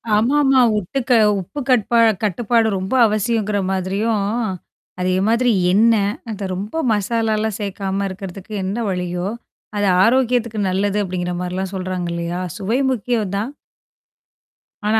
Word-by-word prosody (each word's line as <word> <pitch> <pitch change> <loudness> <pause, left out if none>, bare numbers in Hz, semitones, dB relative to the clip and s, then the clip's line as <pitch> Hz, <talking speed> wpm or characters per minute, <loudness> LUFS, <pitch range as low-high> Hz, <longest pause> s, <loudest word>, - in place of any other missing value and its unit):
ஆமாமா. 270 +4 +3 0.2
உப்பு 210 +8 -2
க - - +5 0.3
உப்பு 240 +11 -7
கட்பா 235 -1 +3 0.2
கட்டுப்பாடு 225 +3 +1
ரொம்ப 190 +5 -4
அவசியங்கிற 215 -1 0
மாதிரியும். 195 +3 0 0.8
அதே 185 0 +1
மாதிரி 235 +2 +3 0.2
எண்ணெ? 220 +1 +4 0.3
அந்த 210 -2 -5
ரொம்ப 210 - -3
மசாலாலாம் 220 0 0
சேர்க்காம 195 0 -2
இருக்கிறதுக்கு 195 +2 -8
என்ன 195 +4 -2
வழியோ? 180 0 -2 0.5
அது 205 - +1 0.2
ஆரோக்கியத்துக்கு 235 -2 +2
நல்லது 200 +2 0
அப்டிங்கிற 180 -1 -3
மாரிலாம் 185 +2 -3
சொல்றாங்க 185 -2 -3
இல்லையா? 170 +1 -3 0.2
சுவை 215 +6 -1
முக்கியம் 220 -4 -1
தான். 220 +6 -2 1.4
ஆனா 220 +1 +3
205 Hz, 120 wpm, -20 LUFS, 190-230 Hz, 1.4 s, க